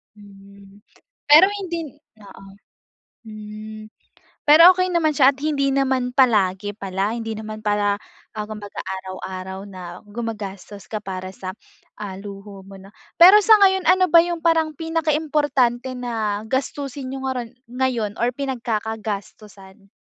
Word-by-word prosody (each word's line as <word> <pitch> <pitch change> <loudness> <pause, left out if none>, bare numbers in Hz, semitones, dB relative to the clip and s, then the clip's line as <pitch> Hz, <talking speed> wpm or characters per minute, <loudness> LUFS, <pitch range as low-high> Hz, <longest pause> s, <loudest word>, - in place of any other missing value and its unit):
hmm. 200 -1 -17 0.5
Pero 305 +5 +9
hindi 345 -3 -4 0.4
oo, 200 -1 -14 0.8
hmm. 215 0 -9 0.6
Pero 335 +5 +9
okey 365 -1 0
naman 315 -3 +1
siya 275 -1 +6
at 270 - -17
hindi 280 -2 0
naman 260 -2 0
palagi 205 -6 +2
pala. 195 +2 -2
Hindi 225 -1 -4
naman 215 0 -8
pala, 205 -1 +1 0.4
ah, 210 - -3
kumbaga 210 -1 -9
araw-araw 190 0 -7
na 190 -2 -11 0.2
gumagastos 205 -3 -7
ka 215 0 -5
para 185 -2 -6
sa, 185 +1 -8 0.4
ah, 200 -3 -7
luho 200 0 -10
mo 195 +1 -13
na 195 +1 -15 0.2
Pero 375 +5 +9
sa 435 +1 +6
ngayon 380 -3 +2
ano 370 +1 +5
ba 335 - +9
yung 340 -1 -3
parang 320 -2 +2
pinakaimportante 295 -6 0
na 220 -4 -3
gastusin 270 +2 -4
niyo 265 0 -6
ngarun 250 -3 -3 0.2
ngayon 250 -5 -1
or 240 +1 +1
pinagkakagastusan? 215 -6 -5
220 Hz, 130 wpm, -21 LUFS, 200-275 Hz, 0.8 s, Pero